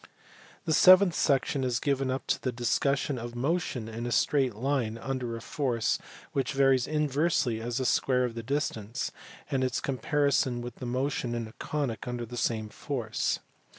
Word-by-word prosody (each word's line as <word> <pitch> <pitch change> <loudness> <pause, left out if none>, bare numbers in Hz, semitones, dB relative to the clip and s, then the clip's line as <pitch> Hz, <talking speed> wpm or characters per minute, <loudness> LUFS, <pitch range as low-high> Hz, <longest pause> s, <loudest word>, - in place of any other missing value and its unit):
The 160 - +1
seventh 185 +2 +7
section 135 -1 +1
is 125 -2 0
given 135 -2 0
up 130 +1 -2
to - - 0
the 130 - -1
discussion 130 +3 0
of 120 +1 -6
motion 135 -3 -1
in 115 +2 -5
a - - -3
straight 130 -3 +2
line 120 -2 -1
under 125 -1 -3
a - - -9
force 120 -2 0 0.3
which 135 +1 -1
varies 135 -2 +3
inversely 150 -5 +1
as 120 +1 -3
the 130 - -1
square 125 0 +2
of 120 - -3
the 115 - -5
distance, 115 -3 -2 0.4
and 135 -2 +1
its 130 - 0
comparison 135 -1 +1
with 120 +1 -8
motion 125 -1 -1
in 115 -1 -3
a 110 - -13
conic 140 -6 -3
under 120 -1 -3
the 120 +2 -9
same 110 -2 -1
force. 120 -2 -2
130 Hz, 170 wpm, -29 LUFS, 120-140 Hz, 0.4 s, seventh